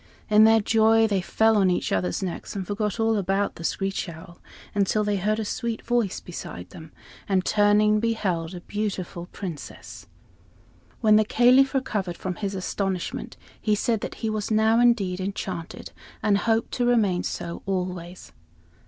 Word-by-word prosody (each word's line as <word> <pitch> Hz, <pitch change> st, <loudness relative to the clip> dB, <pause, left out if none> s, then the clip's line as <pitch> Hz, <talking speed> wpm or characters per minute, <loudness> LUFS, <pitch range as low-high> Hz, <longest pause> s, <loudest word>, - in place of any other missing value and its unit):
In 215 Hz, +1 st, +7 dB
their 225 Hz, 0 st, +6 dB
joy 225 Hz, +1 st, +4 dB
they 200 Hz, -4 st, +1 dB
fell 220 Hz, +4 st, +2 dB
on 195 Hz, -2 st, +4 dB
each 180 Hz, -, -1 dB
other's 90 Hz, -, -1 dB
necks 180 Hz, +2 st, -5 dB
and 190 Hz, -2 st, -3 dB
forgot 210 Hz, +2 st, -2 dB
all 225 Hz, -1 st, +2 dB
about 195 Hz, +1 st, 0 dB
the 165 Hz, -, -10 dB
screech 195 Hz, +1 st, -2 dB
owl, 170 Hz, +1 st, -12 dB, 0.3 s
until 205 Hz, +1 st, +1 dB
they 205 Hz, -1 st, 0 dB
heard 210 Hz, +3 st, 0 dB
a 220 Hz, -, -2 dB
sweet 230 Hz, +1 st, -3 dB
voice 235 Hz, -5 st, 0 dB
beside 90 Hz, -, -8 dB
them, 160 Hz, -1 st, -11 dB, 0.4 s
and 190 Hz, -2 st, +2 dB
turning 210 Hz, 0 st, +4 dB
beheld 190 Hz, -7 st, -1 dB
a 175 Hz, -, -8 dB
beautiful 190 Hz, -4 st, -4 dB
Princess. 170 Hz, -10 st, -8 dB, 0.9 s
When 215 Hz, -2 st, +6 dB
the 215 Hz, -, +5 dB
Caliph 255 Hz, +5 st, +4 dB
recovered 205 Hz, -9 st, -2 dB
from 180 Hz, -2 st, -4 dB
his 200 Hz, -1 st, -3 dB
astonishment 190 Hz, -1 st, -3 dB, 0.2 s
he 215 Hz, -1 st, +2 dB
said 220 Hz, +1 st, 0 dB
that -, -, -5 dB
he -, -, +1 dB
was 215 Hz, -1 st, -3 dB
now, 220 Hz, +1 st, +3 dB
indeed, 205 Hz, -7 st, +2 dB
enchanted 185 Hz, -1 st, -5 dB, 0.3 s
and 205 Hz, -2 st, +3 dB
hoped 225 Hz, 0 st, +1 dB
to 245 Hz, -, 0 dB
remain 210 Hz, -7 st, +2 dB
so 170 Hz, -1 st, -5 dB
always. 180 Hz, -2 st, -4 dB
205 Hz, 160 wpm, -25 LUFS, 180-220 Hz, 0.9 s, In